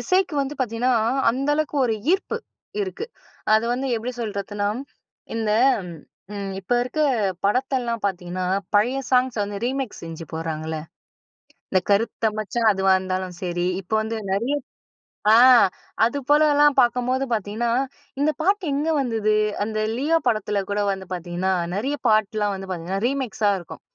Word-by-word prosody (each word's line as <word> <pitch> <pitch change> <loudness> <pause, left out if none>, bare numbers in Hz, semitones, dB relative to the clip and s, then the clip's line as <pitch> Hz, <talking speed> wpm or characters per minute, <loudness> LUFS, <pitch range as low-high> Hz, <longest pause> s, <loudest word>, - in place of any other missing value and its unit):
இசைக்கு 370 -3 +1
வந்து 275 +2 -4
பார்த்தீங்கன்னா, 245 +1 +1 0.4
அந்த 270 +4 -2
அளவுக்கு 305 -1 -1
ஒரு 225 - +1 0.2
ஈர்ப்பு 385 - 0 0.5
இருக்கு. 390 +3 -4 0.5
அது 220 +1 +3
வந்து 260 +2 -2
எப்பிடி 240 +3 -4
சொல்றதுன்னா 205 -1 -2 0.7
இந்த 220 -2 -1 0.8
ம். 200 -1 -4
இப்ப 195 +4 -4
இருக்க 255 +5 -3 0.4
படத்தெல்லாம் 245 +1 0
பார்த்தீங்கன்னா, 185 -1 -2 0.3
பழைய 240 +6 +3
சாங்ஸ 255 -1 +3
வந்து 200 0 -4
ரீமிக்ஸ் 265 -2 -3
செஞ்சு 165 0 -7
போடுறாங்கள்ல, 160 0 -3 0.9
இந்த 185 - +3
கருத்த 225 +2 +2
மச்சான் 220 +2 +1
அதுவா 190 -1 +3
இருந்தாலும் 185 -1 -3
சரி, 175 -1 -2 0.2
இப்போ 195 +3 -4
வந்து 220 +1 -3
நிறைய 200 +6 0 1.5
ஆ - - +8
து 285 - -1
போலலாம் 295 -1 +5
பார்க்கும்போது 250 +2 +2
பார்த்தீங்கன்னா, 220 +2 -1 0.5
இந்த 300 +2 +3
பாட்டு 395 +4 +2
எங்க 295 +3 0
வந்தது? 220 -4 +1 0.3
அந்த 215 0 -3 0.2
லியோ 300 +6 +2
படத்தில 210 -2 +1
கூட 205 +1 0
வந்து 190 -1 -5
பார்த்தீங்கன்னா, 180 +2 -2 0.2
நிறைய 270 +8 -1
பாட்டுலாம் 215 -1 +2
வந்து 190 0 -8
பார்த்தீங்கன்னா 185 +3 -3
ரீமிக்ஸா 245 -6 0
இருக்கும். 175 - -11
220 Hz, 135 wpm, -23 LUFS, 195-260 Hz, 1.5 s, ஆ